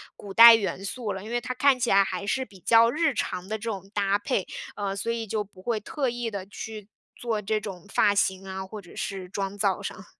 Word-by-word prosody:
古 200 - -10
代 230 +2 +11
元 195 -3 -2
素 225 0 -4
了， 190 +1 -7
因 220 - -8
为 240 - +1
它 255 +1 -4
看 275 -2 +4
起 240 - 0
来 195 0 +6
还 195 +1 -4
是 260 +5 0
比 195 -6 -17
较 230 +6 +5
日 315 0 +1
常 185 -3 -3
的 220 - -2
这 215 - -14
种 195 -1 -7
搭 200 0 +1
配， 205 -2 -1 0.3
呃， 200 -1 -3
所 230 +4 -2
以 230 -1 -3
就 210 0 -1
不 190 -2 -18
会 230 -1 -1
特 270 +6 -3
意 240 -1 -3
地 195 -2 -5
去 210 0 -8 0.3
做 225 -3 -2
这 215 +1 0
种 200 -3 -8
发 200 +1 +4
型 190 -1 0
啊， 190 0 -5
或 210 +2 -8
者 175 - -15
是 190 -2 -4
妆 195 0 -4
造 200 -1 +1
上。 195 0 -7
205 Hz, 260 characters per minute, -26 LUFS, 195-230 Hz, 0.3 s, 代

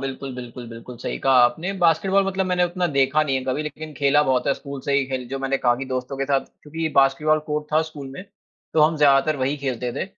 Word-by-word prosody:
बिल्कुल, 135 -1 -5
बिल्कुल, 120 -1 -8
बिल्कुल, 115 +1 -10
सही - - -4
कहा 135 - +2
आपने। 160 +11 -1
बास्केटबॉल 180 +4 +3
मतलब 190 -1 -1
मैंने 180 -1 +2
उतना 175 +1 -1
देखा 140 0 +2
नहीं 140 -3 0
है 130 - -2
कभी 135 +3 -1
लेकिन 155 +1 -7
खेला 145 +2 +3
बहुत 130 -3 +1
है 140 - +2
स्कूल 140 -1 -8
से 140 - -1
ही 140 0 +3
खेल 130 -2 -4
जो 135 0 -4
मैंने 135 0 0
कहा 120 0 +3
कि 135 - -5
दोस्तों 130 +1 -4
के 135 - -1
साथ, 135 -1 +2 0.2
क्योंकि 160 +2 -3
बास्केटबॉल 140 +3 +3
कोर्ट 150 0 -2
था 155 - +4
स्कूल 150 -4 -8
में, 180 +8 -9 0.5
तो 155 - +4
हम 155 +1 +4
ज़्यादातर 145 0 +4
वहीं 135 +2 -1
खेलते 125 -3 -3
थे। - - -3
140 Hz, 240 wpm, -22 LUFS, 130-155 Hz, 0.5 s, था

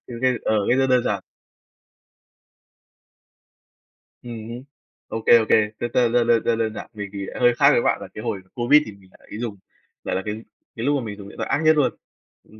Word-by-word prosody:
Thì 120 - -7
OK, 130 +1 +1
ờ, 110 - +1
cách 125 - +3
rất 135 - +3
đơn 125 -2 +2
giản. - - -1 3.0
Ừm 115 -2 -8
hứm. 120 +2 -7 0.4
Ô 110 - -4
kê, 120 - +8
ô 110 - +1
kê, 105 -1 +4
đơn 120 - -3
đơn 120 -2 +3 0.2
đơn 115 -1 +3
đơn 115 -1 +1
đơn 110 -1 -1
giản - - -8
mình 105 -2 -6
thì 100 -1 -5
lại - - -8
hơi 120 -1 +4
khác 140 - +5
với 120 - +3
bạn, - - +1
là 100 - -7
cái 105 - -8
hồi 95 - -3
COVID 135 +5 +4
thì 110 - -8
mình 100 -2 -19
lại - - -23
ý 105 - -6
dùng 115 -4 -4 0.5
lại - - -2
là 95 - -1
cái 105 0 -3 0.4
cái 115 - -4
lúc 145 +1 +2
mà 130 - -3
mình 105 -1 -6
dùng 100 - -10
điện - - -14
thoại - - -4
ác - - +1
nhất 155 0 +5
luôn, 145 -3 +1 0.5
dùng 110 - -19
115 Hz, 235 wpm, -22 LUFS, 105-125 Hz, 3.0 s, kê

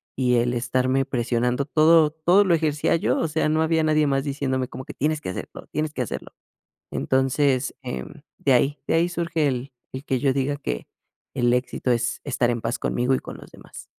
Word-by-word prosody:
y 125 -1 +2
el 120 +1 +1
estarme 130 +3 +1
presionando 125 +2 0
todo 155 +1 +5
todo 175 +6 +4
lo 180 - +3
ejercía 150 -2 +1
yo, - - 0
o - - 0
sea, 155 0 0
no 155 +1 +2
había 160 0 +2
nadie 155 -1 +3
más 135 -1 +1
diciéndome 135 -2 -1
como 130 - -7
que: - - -8
"Tienes 155 +2 0
que - - -5
hacerlo, 90 - -7
tienes 155 0 -2
que - - -3
hacerlo". - - -6 0.6
Entonces, 130 0 +1
em, 65 -1 -7 0.2
de 135 - +2
ahí 140 +4 +2
de - - +2
ahí 165 +2 +3
surge 170 -3 -1
el 130 +1 -3 0.2
el 130 +1 -7
que 130 -4 -1
yo 135 0 +2
diga 140 +1 0
que - - -4 0.5
el 120 0 +2
éxito 125 0 -1
es 120 0 -1
estar 125 -3 +1
en 120 -1 -2
paz 115 +1 -2
conmigo 125 +2 0
y - - 0
con - - -9
los - - -13
demás. - - -12
135 Hz, 205 wpm, -24 LUFS, 125-155 Hz, 0.6 s, todo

